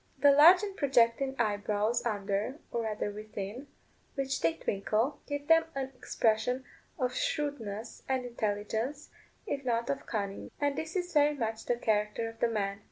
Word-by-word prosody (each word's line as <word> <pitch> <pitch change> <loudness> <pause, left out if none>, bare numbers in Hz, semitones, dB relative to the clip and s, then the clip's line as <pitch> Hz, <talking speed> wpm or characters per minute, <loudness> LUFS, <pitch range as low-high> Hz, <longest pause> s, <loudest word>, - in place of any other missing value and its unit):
The 285 +1 +6
large 330 +7 +8
and 400 -2 -4
projecting 265 -2 +3
eyebrows 210 +1 +1
under, 205 +4 -1
or 235 - -1
rather 215 -2 -2
within, 215 +4 -6 0.5
which 270 -1 -1
they 165 0 +2
twinkle, 215 +7 -1
give 285 0 -4
them 325 0 +6
an 265 -1 -3
expression 245 +2 0 0.3
of 255 -4 0
shrewdness 235 -8 -3
and 260 -1 0
intelligence, 225 +4 -2 0.3
if 285 -8 -3
not 235 - 0
of 140 0 -5
cunning. 200 -2 -3
And 285 -1 +1
this 320 +4 -5
is 355 -1 -2
very 295 -1 +4
much 225 -4 -3
the 245 - +2
character 215 -1 0
of 225 0 -10
the - - +3
man. 200 -3 -1
235 Hz, 160 wpm, -31 LUFS, 210-280 Hz, 0.5 s, large